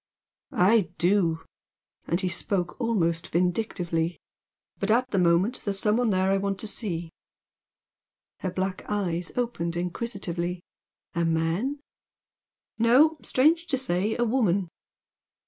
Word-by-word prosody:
"I 195 0 +4
do!" 175 -3 +2 0.6
and 170 +3 0
he 185 - 0
spoke 180 +4 -2
almost 170 -8 0
vindictively 175 -2 0 0.6
"But, 195 - -1
at 250 +4 +2
the 195 - +2
moment, 180 +7 +2
there's 200 -2 -2
some 210 +2 +2
one 245 -2 +2
there 190 -1 +2
I 195 - +3
want 195 0 -2
to - - -6
see." 175 -7 -4 1.3
Her 185 - -2
black 185 +1 -3
eyes 180 -5 -1
opened 170 -9 -1
inquisitively. 180 -2 -3 0.5
"A 170 - 0
man?" 165 - 0 1.0
"No. 280 +7 +5
Strange 325 +6 +2
to 280 -5 +1
say, 215 -4 0
a 240 - +2
woman." 200 -7 +1
190 Hz, 125 wpm, -26 LUFS, 175-230 Hz, 1.3 s, No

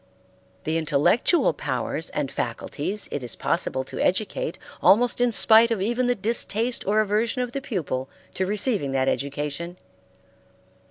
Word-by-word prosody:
The 160 +1 0
intellectual 160 - +2
powers - - -3
and - - -3
faculties 210 +2 -3
it 145 - -3
is 125 - 0
possible 130 - -1
to - - -8
educate 215 - -1 0.2
almost 245 +4 +4
in 245 -1 +3
spite 225 +1 +5
of 230 -3 -1
even 240 +5 0
the 245 - +2
distaste 230 +2 +1
or 210 +2 +3
aversion 220 +4 0
of 245 - -5
the 275 - -4
pupil 150 - -3 0.2
to 185 - -1
receiving 205 - -1
that 130 0 +1
education. 145 +6 -3
210 Hz, 145 wpm, -24 LUFS, 150-235 Hz, 0.2 s, spite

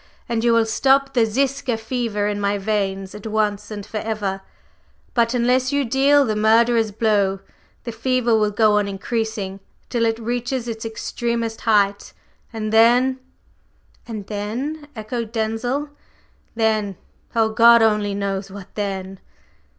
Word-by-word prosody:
"And 230 -2 -1
you 235 - +4
will 230 -1 +4
stop 270 +4 +2
the 235 -3 +3
Ziska 260 +1 0
fever 225 -2 -2
in 205 0 -2
my 200 0 +1
veins 195 -2 -2
at 210 +1 -8
once 210 -2 -1
and 205 -2 -6
forever. 210 -3 -3 0.7
But, 235 0 +2
unless 250 +2 +2
you 285 -1 +1
deal 275 +3 +4
the 215 -3 -1
murderer's 225 +1 +3
blow, 200 -2 +1 0.4
the 235 - -5
fever 240 0 +1
will 215 -1 +2
go 210 0 +3
on 205 - -1
increasing 200 -1 -3 0.3
till 230 -2 +1
it 225 0 0
reaches 240 +2 -3
its 225 -1 -5
extremest 230 0 -3
height, 205 -2 +1 0.4
and 220 -2 -4
then 245 +4 +4 0.4
…" - - -36
"And 215 -4 -6
then?" 245 +10 -4
echoed 225 +1 -4
Denzil. 235 +6 -2 0.7
"Then? 215 -4 0 0.4
Oh 225 -1 +3
God 230 +1 +6
only 210 -2 +1
knows 195 -1 -3
what 200 0 -11
then!" 195 -2 -4
225 Hz, 145 wpm, -21 LUFS, 205-235 Hz, 0.7 s, God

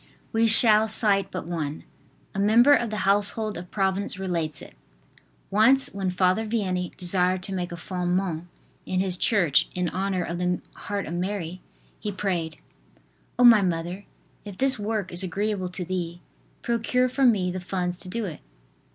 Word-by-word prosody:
We 225 0 +3
shall 220 -1 +5
cite 205 -3 +1
but 185 - -5
one. 160 -3 -4 0.5
A 195 - -3
member 230 +7 +6
of 240 -5 +2
the 210 -2 -3
household 205 +2 +1
of 175 0 -8
Providence 195 -1 -1
relates 165 -6 -2
it: - - -11 0.8
"Once 235 +7 +4
when 195 -2 -2
Father 185 +3 +2
Vianney 185 -5 -2
desired 180 0 0
to 195 - -4
make 180 -2 -3
a - - -4
"Fondement" 180 -1 -2 0.4
in 185 - 0
his 185 -1 +1
church 180 - +2
in 180 -1 0
honor 190 -1 -1
of 170 +1 -4
the 180 0 0
heart 205 -1 -4
of 160 - -6
Mary, 180 -1 -3 0.4
he 210 - -3
prayed: 180 -5 -2 0.8
O, 245 - +3
my 230 -4 +8
mother! 180 +2 -2 0.4
if 205 -3 -9
this 265 -3 +3
work 205 -2 -2
is 175 - +2
agreeable 195 0 -2
to 180 0 -5
thee, 175 -1 -4 0.4
procure 240 +2 +1
for 265 +2 -1
me 200 -8 +3
the 185 - -4
funds 180 -1 -2
to 185 - -6
do 230 +3 -2
it. 170 -5 -7
190 Hz, 170 wpm, -25 LUFS, 180-210 Hz, 0.8 s, my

